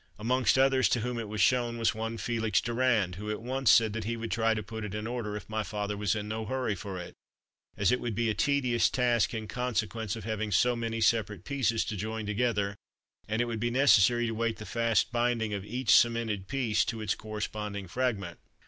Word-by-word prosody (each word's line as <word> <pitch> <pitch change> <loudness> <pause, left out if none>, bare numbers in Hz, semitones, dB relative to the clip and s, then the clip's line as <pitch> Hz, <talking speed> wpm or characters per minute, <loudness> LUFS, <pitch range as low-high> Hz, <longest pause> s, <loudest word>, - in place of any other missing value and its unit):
Amongst 125 +4 +2
others 135 -1 +4
to 120 - +1
whom 125 0 -3
it 115 - -4
was 105 -2 -2
shown 120 +3 +2
was 115 -1 +2
one 115 +1 -4
Felix 110 -3 0
Durand, 115 -7 +1
who 105 +2 -6
at 105 - -2
once 130 +1 0
said 110 -1 +5
he 115 +2 -3
would 115 -1 -5
try 110 +1 +2
to 110 - -3
put 110 +2 -7
it 105 -1 -5
in 105 +1 -4
order 115 -3 -3
if - - -10
my 110 0 -2
father 105 -1 -3
was 100 -2 0
in 105 -1 -4
no 110 +1 -3
hurry 125 0 -1
for 95 -1 -6
it, 90 - -8 0.6
as 100 -2 +3
it 125 - +2
would 120 -3 -3
be 115 +2 0
a 110 - +1
tedious 125 0 +2
task 120 -4 +2
in 110 -1 -4
consequence 115 -3 -2
of 110 - -8
having 110 0 -3
so 120 +5 +3
many 115 -1 -3
separate 105 -5 +1
pieces 120 -5 0
to 110 - -4
join 110 +2 -4
together, 105 -2 0 0.5
and 110 +2 0
it - - -2
would 115 -2 -4
be 120 +2 0
necessary 120 -2 +4
to 115 - -2
wait 115 0 -1
the 110 - -8
fast 115 +2 +1
binding 120 -2 0
of 100 -2 -3
each 125 +4 +1
cemented 115 -5 +2
piece 125 -6 +1
to 115 - -3
its 105 -2 0
corresponding 105 -2 -5
fragment. 100 -5 -2
110 Hz, 220 wpm, -29 LUFS, 105-120 Hz, 0.6 s, said